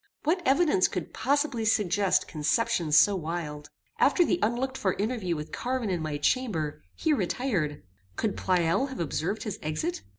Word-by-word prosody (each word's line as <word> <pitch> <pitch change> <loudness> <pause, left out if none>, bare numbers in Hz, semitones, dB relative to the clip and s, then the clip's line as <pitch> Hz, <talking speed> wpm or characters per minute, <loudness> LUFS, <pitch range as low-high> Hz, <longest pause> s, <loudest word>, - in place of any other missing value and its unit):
What 340 +5 +1
evidence 275 - +4
could 180 -4 -5
possibly 280 -3 0
suggest 205 -3 +2
conceptions 160 +1 +1
so 205 - +6
wild? 155 -4 -5 0.3
After 350 - +4
the 350 - +1
unlooked 250 +4 0
for 190 -7 0
interview 205 -5 -2
with 150 0 -6
Carwin 250 -4 -2
in 175 -3 -1
my 155 -2 -3
chamber, 160 - -1
he 315 - +1
retired. 180 - -1 0.3
Could 215 -3 -1
Pleyel 180 +7 +1
have 265 - -8
observed 170 +6 -2
his 210 -5 -5
exit? 155 +1 -2
195 Hz, 155 wpm, -28 LUFS, 160-255 Hz, 0.3 s, so